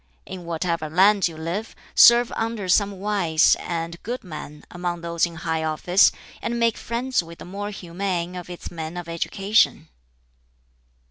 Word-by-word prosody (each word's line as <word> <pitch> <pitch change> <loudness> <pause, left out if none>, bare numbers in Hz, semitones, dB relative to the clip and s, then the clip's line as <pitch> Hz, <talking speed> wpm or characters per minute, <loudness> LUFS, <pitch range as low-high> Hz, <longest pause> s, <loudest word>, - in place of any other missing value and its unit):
In 185 -2 -8
whatever 170 -1 -2
land 195 +4 +4
you 165 -2 -9
live, 170 +8 -4 0.2
serve 240 0 +7
under 225 -3 -2
some 200 +1 +2
wise 190 -6 +3
and 170 0 -4
good 245 +3 -5
man 155 -4 -9
among 175 -1 -3
those 170 0 0
in 170 - -11
high 160 -1 -2
office, 160 +4 +4 0.3
and 235 0 -2
make 230 -1 +2
friends 245 0 -1
with 170 0 -12
the - - -10
more 200 +3 -5
humane 180 -2 -3
of 180 0 -7
its 175 - -8
men 165 0 -6
of 175 -1 -6
education." 195 +5 +1
180 Hz, 155 wpm, -23 LUFS, 170-205 Hz, 0.3 s, serve